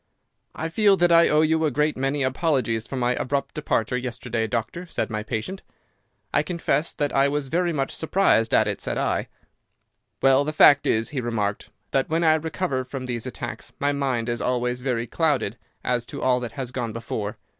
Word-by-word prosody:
"'I 160 +2 -3
feel 200 +2 +4
that 175 -1 +3
I 170 0 +6
owe 150 0 +4
you 160 +1 +2
a 155 - +3
great 150 +2 +1
many 135 +2 0
apologies 130 -5 0
for - - -5
my 125 -1 +1
abrupt 140 +3 -2
departure 125 -6 -1
yesterday, 120 -2 -3
doctor,' 120 +10 -3
said 165 - -3
my 110 0 -2
patient. 115 - -4 0.7
"'I - - +4
confess 170 -2 -1
that 145 -1 -2
I 135 +1 +5
was 140 -1 -2
very 175 +2 +1
much 135 -4 -1
surprised 160 -9 +2
at 110 - +4
it,' 100 - -3
said - - -2
I. - - 0 0.9
"'Well, 135 +1 +4
the 155 +2 -3
fact 145 -2 +6
is,' 110 +1 +1
he 135 -4 -3
remarked, 105 -4 -2 0.2
'that 135 -1 +1
when 165 +2 +1
I 160 -1 +6
recover 160 -3 -1
from 130 0 -6
these 120 -1 -3
attacks 120 -1 -7
my 145 +1 +2
mind 130 -5 -1
is 120 -1 -2
always 125 0 -1
very 125 -3 -1
clouded 140 -7 0 0.3
as 120 -2 -1
to - - -6
all 125 -1 +3
that 120 -2 -6
has 130 -3 -5
gone 120 -4 -3
before. 110 -2 -4
130 Hz, 195 wpm, -24 LUFS, 120-155 Hz, 0.9 s, I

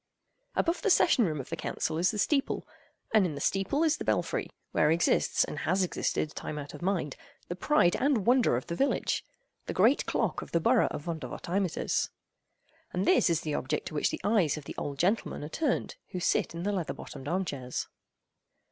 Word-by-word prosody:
Above 335 +1 +1
the 425 - +1
session 295 - +5
room 155 -2 -2
of 130 - -7
the 165 - -2
Council 160 0 -2
is 180 - +3
the 215 - -3
steeple, 275 +6 0 0.5
and 215 -2 +6
in 165 -5 -1
the - - -5
steeple 195 - +1
is 310 -2 +3
the - - -5
belfry, - - 0 0.2
where 150 - +3
exists, 165 +2 +3
and - - -5
has 185 +4 +1
existed 155 -3 -1
time 150 - -5
out 145 -1 -6
of - - -9
mind, 175 -6 -1 0.3
the 175 - -2
pride 185 - +3
and 265 -7 +1
wonder 245 - +4
of 125 - -5
the - - -4
village—the 280 - -2
great - - +4
clock - - 0
of - - -10
the 170 - +4
borough 165 - +4
of 145 - -5
Vondervotteimittiss. 175 +2 -2 0.8
And 180 +2 -1
this - - +4
is 165 -1 +1
the 155 - -3
object 130 - -2
to - - -12
which 150 - +1
the - - -5
eyes 195 -8 +2
of 155 - -7
the - - -7
old 140 -1 -4
gentlemen 190 0 0
are 150 - -5
turned 295 - -1
who 180 - -4
sit 170 - +1
in 170 - -4
the 205 - 0
leather 180 -6 -2
bottomed 135 - -9
arm 185 +4 0
chairs. 130 -6 -4
175 Hz, 200 wpm, -29 LUFS, 155-215 Hz, 0.8 s, and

